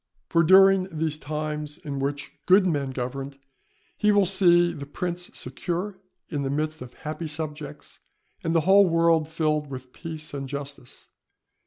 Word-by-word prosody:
For 165 - +4
during 190 +2 +6
these 155 -1 -2
times 150 0 -4
in 140 -2 -5
which 140 +1 -3 0.2
good 190 +2 +6
men 145 -6 0
governed, 135 +2 -5 0.6
he 210 - +3
will 205 -1 +4
see 175 -2 +4
the 140 -3 -8
prince 175 +3 -3
secure 180 +9 -3 0.3
in 145 -4 -3
the 135 - -2
midst 155 +2 -2
of 125 -1 -10
happy 155 +1 -5
subjects, 150 -1 -6 0.4
and 165 0 0
the 165 - +4
whole 190 +3 +5
world 165 -1 +3
filled 155 -2 0
with 130 -1 -8
peace 160 -3 -7
and 135 -1 -5
justice. 140 -2 -8
155 Hz, 155 wpm, -25 LUFS, 145-175 Hz, 0.6 s, during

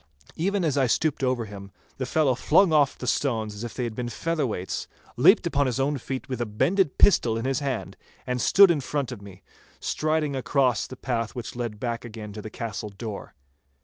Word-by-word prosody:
Even 195 +2 0
as 145 -3 +1
I 130 - +3
stooped 145 +3 0
over 125 -3 +1
him, 100 -1 -10 0.3
the 130 - -3
fellow 145 -2 +2
flung 165 +7 +4
oft 145 -3 +3
the - - -6
stones 115 -5 0
as 105 +2 -7
if 120 - -6
they 125 - -2
had 120 -2 -3
been 120 +1 -4
featherweights, 135 - -2 0.3
leaped - - +5
upon 140 -1 +1
his 125 +1 -2
own 140 +1 0
feet 130 +2 -5
with 130 -2 -4
a - - +1
bended 165 - +1
pistol 115 - +4
in 115 - -3
his 135 -1 0
hand, 135 -4 -3 0.3
and 125 -1 -2
stood 195 -2 +7
in 155 -4 0
front 140 -1 -2
of 115 -5 -7
me, 100 -2 -13 0.4
striding 155 -2 0
across 130 -3 +1
the 130 - -10
path 115 -4 -2
which 120 -1 -6
led 120 -4 -4
back 120 -1 -3
again 110 -3 -8
to 105 - -7
the 110 - -7
castle 110 -1 -5
door. 100 0 -7
125 Hz, 210 wpm, -26 LUFS, 115-145 Hz, 0.4 s, stood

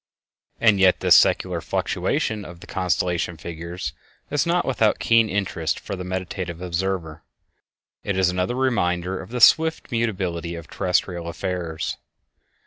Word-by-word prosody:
And 110 -4 +4
yet 95 -1 +4
this - - +5
secular - - +3
fluctuation 110 -2 -1
of 85 -3 -10
the - - -12
constellation 90 -2 -1
figures 85 -2 -6 0.4
is 145 +2 +1
not 175 +1 +2
without 115 -5 +2
keen 115 -1 +3
interest 95 -5 -1
for 100 - -5
the 90 - -6
meditative 90 -2 -4
observer. 90 -2 -3 0.8
It 100 -2 -2
is 95 -1 +3
another 90 +6 -1
reminder 95 -8 0
of 95 - -11
the 125 +1 -3
swift 160 +7 +4
mutability 95 -7 -2
of 85 -1 -9
terrestial 90 -2 -1
affairs. 85 -2 -3
90 Hz, 135 wpm, -23 LUFS, 85-105 Hz, 0.8 s, this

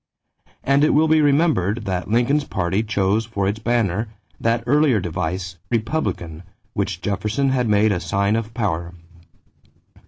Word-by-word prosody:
And 140 +2 +3
it 150 - +3
will 155 +2 +4
be 155 0 +4
remembered 140 - +2
that 90 -2 -2
Lincoln's 125 +6 +2
party 95 +3 -1
chose 105 0 0
for 100 -4 -2
its 105 +2 -1
banner 110 -2 0 0.3
that 115 0 0
earlier 140 -2 +3
device 90 +1 -4
Republican 110 - -2 0.3
which 90 - -2
Jefferson 105 +8 -1
had 125 -3 0
made 105 +1 +3
a 90 - 0
sign 100 +4 0
of 115 0 -3
power. 90 -6 -2
110 Hz, 145 wpm, -21 LUFS, 95-125 Hz, 0.3 s, will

